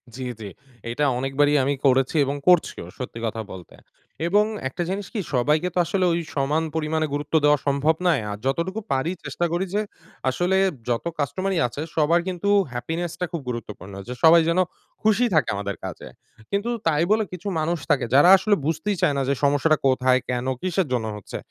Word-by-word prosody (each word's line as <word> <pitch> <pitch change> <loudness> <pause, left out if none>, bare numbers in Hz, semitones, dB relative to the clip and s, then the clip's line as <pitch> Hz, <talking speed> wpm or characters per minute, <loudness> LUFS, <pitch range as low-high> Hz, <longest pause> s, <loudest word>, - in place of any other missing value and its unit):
জ্বি, 130 0 -5
জ্বি। 105 -2 -6 0.4
এইটা 135 +5 0
অনেকবারই 135 +3 +2
আমি 140 +2 +1
করেছি 130 +2 +3
এবং 140 +1 -2
করছিও, 175 - +3
সত্যি 125 -2 -6
কথা 110 0 -3
বলতে। 90 -2 -11 0.5
এবং 205 +4 +4 0.2
একটা 175 - -3
জিনিস 195 0 -3
কি 220 - -2
সবাইকে 150 +7 +2
তো - - -2
আসলে 185 +2 0
ওই 170 - 0 0.2
সমান 145 +3 +1
পরিমাণে 155 0 0
গুরুত্ব 145 +1 -4
দেওয়া 150 0 +5
সম্ভব 140 +3 +2
নয় 160 -8 +3
আ - - -2
যতটুকু 170 +9 -1
পারি 135 +5 0
চেষ্টা 175 - -2
করি 175 +3 0
যে, 210 - +2 0.5
আসলে 175 +8 +1 0.3
যত 120 +4 -1
কাস্টমারই 175 +6 -1
আছে 140 +5 -7
সবার 160 +2 +3
কিন্তু 185 +2 -2 0.2
happiness 160 +8 -3
টা 180 - 0
খুব 170 - -3
গুরুত্বপূর্ণ। 105 -5 -7
যে 125 - -4
সবাই 165 +1 +8
যেন 170 +2 +2 0.4
খুশি 220 +3 +3
থাকে 155 -6 +3
আমাদের 100 0 -3
কাজে। - - -7 0.4
কিন্তু 200 +4 -1 0.2
তাই 155 0 +3
বলে 220 0 +4
কিছু 180 +3 -7
মানুষ 165 +3 0
থাকে, - - +2
যারা 145 +6 +7
আসলে 205 +2 +2
বুঝতেই 165 +6 -1
চায় 145 - +3
না - - +1
যে - - +3
সমস্যাটা 145 +2 +3
কোথায়, 130 0 +3
কেন, 125 0 -1 0.2
কিসের 185 -2 0
জন্য 120 -3 0
হচ্ছে? 105 - -7
155 Hz, 185 wpm, -23 LUFS, 130-175 Hz, 0.5 s, সবাই